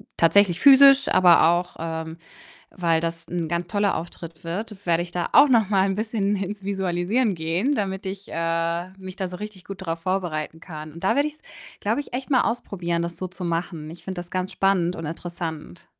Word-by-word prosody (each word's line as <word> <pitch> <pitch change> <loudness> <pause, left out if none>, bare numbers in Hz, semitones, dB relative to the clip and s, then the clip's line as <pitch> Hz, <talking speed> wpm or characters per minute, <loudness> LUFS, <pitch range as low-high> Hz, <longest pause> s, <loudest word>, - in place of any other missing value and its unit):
tatsächlich 175 +1 +4
physisch, 275 0 +8
aber 175 -3 +6
auch, 175 +1 0
ähm, 160 0 -4 0.5
weil 170 -3 +1
das 165 0 -4
'n 170 -2 -2
ganz 170 +1 -2
toller 205 +2 +1
Auftritt 165 -1 -8
wird, 205 +4 -6
werde 170 0 +2
ich 175 - -10
da 175 -1 -2
auch 295 - +8
noch 230 -7 +3
mal 195 -2 +3
'n 195 - 0
bisschen 210 -2 -1
ins 200 +1 -4
Visualisieren 195 +3 0
gehen, 170 - 0
damit 195 -3 -3
ich, 195 +1 -6
äh, 165 +1 -1
mich 190 -1 -9
da 190 - -3
so 180 - -7
richtig 210 -3 -8
gut 195 -1 -8
drauf 165 0 -3
vorbereiten 165 -4 -2
kann 155 -3 -8
und 170 - -11
da - - +3
werde 285 +1 +2
ich's, 300 0 -9 0.4
glaube 290 - 0
ich, - - -14
echt 260 +3 -4
mal 255 - +5
ausprobieren, 175 -7 -2
das 170 0 -5
so 185 - -4
zu 180 0 -9
machen. 165 -2 -3
Ich 170 - -12
finde 190 -1 -5
das 175 0 -9
ganz 185 +1 -2
spannend 185 -3 +1
und 165 - -6
interessant. 160 - -6
180 Hz, 205 wpm, -24 LUFS, 165-200 Hz, 0.5 s, physisch